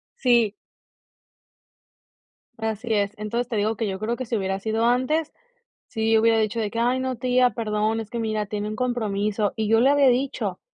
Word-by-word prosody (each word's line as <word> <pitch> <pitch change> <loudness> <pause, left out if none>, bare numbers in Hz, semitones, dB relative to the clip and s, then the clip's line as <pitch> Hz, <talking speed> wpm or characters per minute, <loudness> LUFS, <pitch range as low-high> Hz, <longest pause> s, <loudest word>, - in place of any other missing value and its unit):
Sí. 240 -5 +3 2.0
Así 220 +1 -3
es. 200 -1 0
Entonces, 225 +3 -2
te 240 - -4
digo 215 +2 0
que 220 0 -2
yo 190 -1 -4
creo 220 +3 -1
que 255 - -5
si 230 - -2
hubiera 195 0 -2
sido 220 +3 -1
antes, 260 +6 +1 0.6
si 225 0 +1
hubiera 225 0 +4
dicho 220 +1 0
de 210 -2 -2
que: 230 - -5
"Ay, 245 +2 +1
no, 260 -1 -2
tía, 250 +1 +3
perdón, 215 -1 -1
es 220 -1 -8
que 235 - -4
mira, 215 -2 -1
tenía 210 +1 -4
un 215 - -5
compromiso". 215 -4 -1
Y 215 -1 -1
yo 225 0 +4
le 265 +3 +5
había 285 -1 +5
dicho, 245 -7 -1
225 Hz, 190 wpm, -24 LUFS, 210-245 Hz, 2.0 s, le